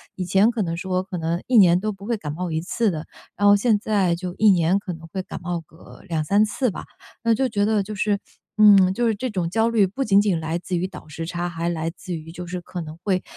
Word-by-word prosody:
以 185 - -3
前 195 +6 +4
可 235 -2 -2
能 165 -2 -2
说 185 +1 -1
可 185 -1 -6
能 165 +1 -2
1 255 - +3
年 180 -4 +6
都 215 +2 -2
不 200 0 -12
会 235 +1 -1
感 150 -7 -5
冒 175 +2 -4
1 160 - 0
次 215 +5 0
的， 155 -2 -5 0.3
然 205 - +3
后 205 - +8
现 210 0 +2
在 200 -5 +1
就 180 +1 -6
1 215 -1 +5
年 175 0 +3
可 200 -2 -6
能 165 0 -11
会 190 +3 -4
感 - - -8
冒 175 -1 -3
个 160 +1 -16
2-3 165 +6 +2
次 240 +4 0
吧。 - - -7 0.4
那 230 -1 +3
就 260 +4 +1
觉 205 -4 0
得 215 -1 +2
就 210 +2 -7
是 205 0 0 0.4
嗯， 200 -3 +7
就 240 +4 0
是 225 - +1
这 255 +5 -3
种 180 -6 -2
焦 225 +4 +2
虑 220 -4 +3
不 235 +9 -3
仅 200 -5 +4
仅 200 -4 +1
来 160 +1 -2
自 180 +1 -4
于 180 - -1
倒 190 - -12
时 160 +2 -6
差， 175 +1 -3
还 170 0 -3
来 165 -1 -2
自 180 +1 -8
于 160 0 -7
就 180 0 -7
是 180 +1 -4
可 180 0 -7
能 155 0 -8
会 185 -3 0
185 Hz, 270 characters per minute, -23 LUFS, 170-210 Hz, 0.4 s, 后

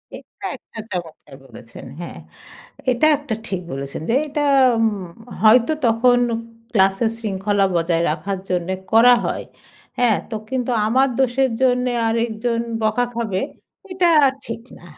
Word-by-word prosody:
এটা - - -12
একটা 225 - -12
চমৎকার 165 -6 -7
বলেছেন, 115 -3 -12
হ্যাঁ। 175 - -7 0.7
এটা 245 +5 +2
একটা 280 -7 -4
ঠিক 190 -2 -3
বলেছেন 135 +2 -5
যে - - +2
এটা 295 +1 -2 0.4
উম 205 -6 -1 0.3
হয়তো 235 +6 +6
তখন 240 +2 +4 0.5
ক্লাসের 195 +2 +3
শৃঙ্খলা 205 -2 -1
বজায় 165 0 +1
রাখার 195 -1 -3
জন্যে 180 +1 -1 0.2
করা 240 +2 +7
হয়। - - -2 0.5
হ্যাঁ? 240 -4 +3
তো 220 - -4
কিন্তু 255 -1 -1 0.2
আমার 260 +4 +3
দোষের 265 +1 +2
জন্যে 250 -1 +2 0.2
আরেকজন 230 +1 -1 0.2
বকা 220 +3 +1
খাবে, 220 -5 -2 0.5
এটা 365 -1 +2 0.4
ঠিক 230 0 -6 0.2
না - - -18
225 Hz, 130 wpm, -20 LUFS, 190-245 Hz, 0.7 s, করা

